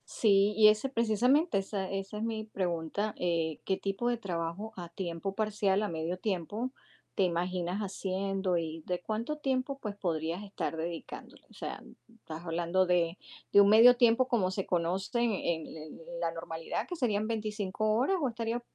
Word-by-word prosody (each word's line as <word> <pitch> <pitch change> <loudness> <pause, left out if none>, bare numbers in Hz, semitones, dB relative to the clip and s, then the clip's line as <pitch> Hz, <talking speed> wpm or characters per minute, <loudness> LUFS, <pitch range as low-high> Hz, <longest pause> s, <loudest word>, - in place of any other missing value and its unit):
Sí, 200 -1 +3
y 215 -1 +8
ese 215 +5 +1
precisamente, 250 - +3
esa 195 -1 -2
esa 195 +1 -4
es 215 - -3
mi 225 -1 -2
pregunta, 185 0 -2
eh, 165 -3 0
¿qué 190 - +1
tipo 200 +5 -1
de 240 - 0
trabajo 185 +1 -4
a 175 -2 -7
tiempo 175 +2 -4
parcial, 210 -2 +1
a - - 0
medio 165 +2 -3
tiempo, 205 +5 -2 0.4
te 195 - +3
imaginas 180 +1 -1
haciendo 195 -2 -1
y 165 -1 -4
de 180 -1 -2
cuánto 230 +10 -3
tiempo, 270 -1 -1
pues, 210 -5 -5
podrías 170 -1 -2
estar 200 -4 -3
dedicándole? 165 +1 -6
O - - -19
sea, - - -6 0.3
¿estás 165 -6 -9
hablando 170 +2 +1
de 175 -1 +2 0.4
de 200 - +9
un 200 - +6
medio 230 +4 +9
tiempo 240 +1 +4
como 205 -7 +1
se 190 0 -2
conoce 185 +6 0
en 235 -1 +2
en 170 -5 -1
en 485 - -9
la - - 0
normalidad, 480 -1 -4
que 355 - -4
serían 215 -8 0
25 215 -1 -1
horas 275 - +2
o 275 - +2
estarías, 230 0 -2
200 Hz, 175 wpm, -31 LUFS, 175-225 Hz, 0.4 s, de